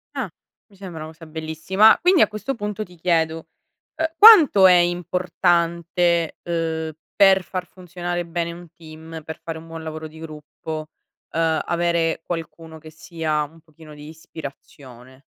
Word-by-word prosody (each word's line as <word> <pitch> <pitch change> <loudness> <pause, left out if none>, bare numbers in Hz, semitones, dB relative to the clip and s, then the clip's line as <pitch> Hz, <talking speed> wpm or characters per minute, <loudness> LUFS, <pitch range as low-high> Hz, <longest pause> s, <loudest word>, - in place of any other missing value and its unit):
Ah, 260 -7 -2 0.4
mi 200 - -22
sembra 180 -5 -8
una 160 - -9
cosa 165 0 -14
bellissima, 160 +7 +3
quindi 360 -1 +4
a - - +6
questo 215 +6 -5
punto 210 0 -4
ti 180 -3 -16
chiedo, 165 -1 0 0.5
uhm, 320 +1 +1
quanto 325 - +9
è 185 - +7
importante, 175 -1 +1
uhm, 160 -2 -2 0.2
per 195 -2 +5
far 185 -1 -5
funzionare 175 -1 -5
bene 170 0 -3
un 175 0 -12
team, 160 0 -11
per 160 - -8
fare 165 -1 -5
un 165 - -13
buon 165 0 -8
lavoro 155 0 -7
di 160 +1 -15
gruppo, 155 0 -8 0.4
uhm, 160 -1 +1
avere 170 -1 0
qualcuno 165 -1 -7
che 155 0 -13
sia 160 -1 -3
un 160 +3 -15
pochino 155 -1 -16
di 150 +1 -11
ispirazione? 135 -5 -12
165 Hz, 150 wpm, -22 LUFS, 160-180 Hz, 0.5 s, quanto